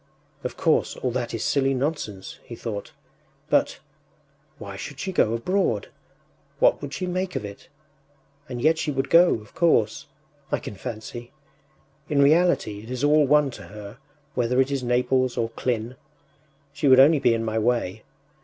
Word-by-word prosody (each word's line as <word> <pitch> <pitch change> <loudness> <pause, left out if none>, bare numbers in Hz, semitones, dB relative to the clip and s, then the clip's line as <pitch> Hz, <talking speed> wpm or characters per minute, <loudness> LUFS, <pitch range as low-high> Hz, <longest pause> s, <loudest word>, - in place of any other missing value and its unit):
“Of - - -5
course, - - +1
all 125 - -2
that 120 -1 -3
is 115 - -3
silly 135 -1 +1
nonsense,” 130 -8 -4
he 120 - -9
thought; 105 -3 -6 0.6
“but... - - +2 0.8
why - - -8
should - - -8
she 190 - -3
go 115 -11 +2
abroad? 120 - 0 0.7
What - - +3
would 145 -2 -6
she 185 - -3
make 180 +1 -3
of - - -3
it? 100 0 -10 0.8
And 125 -2 -5
yet 160 +1 +3
she 155 - -2
would 135 -1 -2
go, 175 +1 +6
of 105 -2 -11
course.... 115 -11 +1 0.4
I - - +2
can - - -8
fancy... 120 +3 -7 0.8
In 145 - +1
reality 145 - +3
it 110 - -12
is 125 +1 -4
all 150 0 +4
one 150 -1 +4
to - - -10
her, 105 +3 -10 0.3
whether 125 +1 +1
it 135 +1 +2
is 140 -1 -1
Naples 125 +1 +1
or 115 -1 -1
Klin. 120 0 -2 0.8
She 145 0 -1
would 130 -1 +7
only 145 +3 +6
be 120 -3 +3
in 115 0 -2
my 110 0 -1
way. 115 -4 0
125 Hz, 170 wpm, -24 LUFS, 115-145 Hz, 0.8 s, would